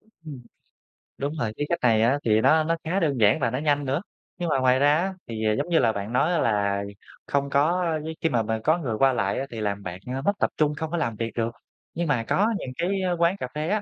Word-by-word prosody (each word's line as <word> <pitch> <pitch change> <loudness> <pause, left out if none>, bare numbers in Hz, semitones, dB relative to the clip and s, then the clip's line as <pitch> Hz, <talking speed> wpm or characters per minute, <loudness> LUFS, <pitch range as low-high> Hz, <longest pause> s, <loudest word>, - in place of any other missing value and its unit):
Ừm. 160 - -12 0.8
Đúng 140 +2 -3
rồi, 110 -6 -2
cái 145 - -1
cách 170 - 0
này 115 -3 +4
á, 130 +6 +3
thì 110 -1 +3
nó 155 +6 +4
nó 165 +2 0
khá 180 +5 0
đơn 145 -7 0
giản 105 +6 +4
và 130 - +1
nó 125 - -2
nhanh 145 0 +1
nữa. 140 +5 -1 0.4
Nhưng 175 -2 -2
mà 135 - +2
ngoài 130 0 +3
ra 145 +1 +4
á 190 +3 -1
thì, 110 -1 -4
giống 145 +5 -2
như 170 - +4
là, 115 - +3
bạn 100 +2 -5
nói 150 +7 +2
á 170 - +1
là 100 -4 +1 0.4
không 140 0 0
có 165 +6 +2 0.2
với 160 +1 -5
khi 165 - +2
mà 115 -5 +1
mà 110 +1 -2
có 155 +5 +3
người 135 -10 -3
qua 135 +1 +4
lại 100 -5 0
á 135 - -2
thì 115 - -6
làm 100 -1 -2
bạn, 90 0 -6 0.2
ơ, 135 - -3
mất 200 - +2
tập - - +2
trung 150 -1 +2
không 160 +1 -4
có 175 - -1
làm 120 -9 -1
việc 115 +1 -3
được. 115 0 -1 0.4
Nhưng 170 0 -2
mà 125 -6 +1
có 200 - +2
những 130 - -6
cái, 190 +3 0
ơ, 180 -1 0
quán 170 +3 +2
cà 125 - -4
phê 155 +2 -2
á 210 +1 +1
140 Hz, 275 wpm, -25 LUFS, 115-165 Hz, 0.8 s, này